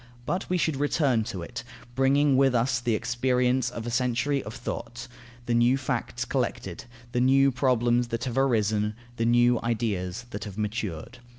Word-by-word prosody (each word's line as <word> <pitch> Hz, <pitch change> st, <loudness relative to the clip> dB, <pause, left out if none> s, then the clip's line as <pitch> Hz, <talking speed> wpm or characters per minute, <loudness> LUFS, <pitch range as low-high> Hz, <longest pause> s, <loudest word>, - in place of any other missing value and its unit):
But 180 Hz, +8 st, -2 dB
we 180 Hz, -, +1 dB
should 160 Hz, -4 st, 0 dB
return 140 Hz, -5 st, +2 dB
to 95 Hz, -6 st, -5 dB
it, -, -, -7 dB, 0.3 s
bringing 135 Hz, +2 st, +3 dB
with 135 Hz, -1 st, +4 dB
us 120 Hz, +1 st, +2 dB
the 120 Hz, -2 st, 0 dB
experience 125 Hz, +2 st, +1 dB
of 115 Hz, -2 st, -7 dB
a 120 Hz, -, -3 dB
century 125 Hz, +3 st, 0 dB
of 105 Hz, -, -8 dB
thought, 120 Hz, +1 st, -6 dB, 0.4 s
the 120 Hz, -, 0 dB
new 120 Hz, +3 st, +4 dB
facts 135 Hz, -, -3 dB
collected, -, -, -3 dB, 0.3 s
the 125 Hz, -, 0 dB
new 135 Hz, +2 st, +5 dB
problems 120 Hz, -2 st, +2 dB
that 115 Hz, -1 st, -3 dB
have 125 Hz, -3 st, -3 dB
arisen, 110 Hz, -5 st, +1 dB, 0.2 s
the 115 Hz, -, 0 dB
new 120 Hz, 0 st, +4 dB
ideas 110 Hz, -2 st, -2 dB
that 100 Hz, -, -5 dB
have 100 Hz, -1 st, -8 dB
matured. 105 Hz, -1 st, -4 dB
120 Hz, 170 wpm, -27 LUFS, 115-130 Hz, 0.4 s, new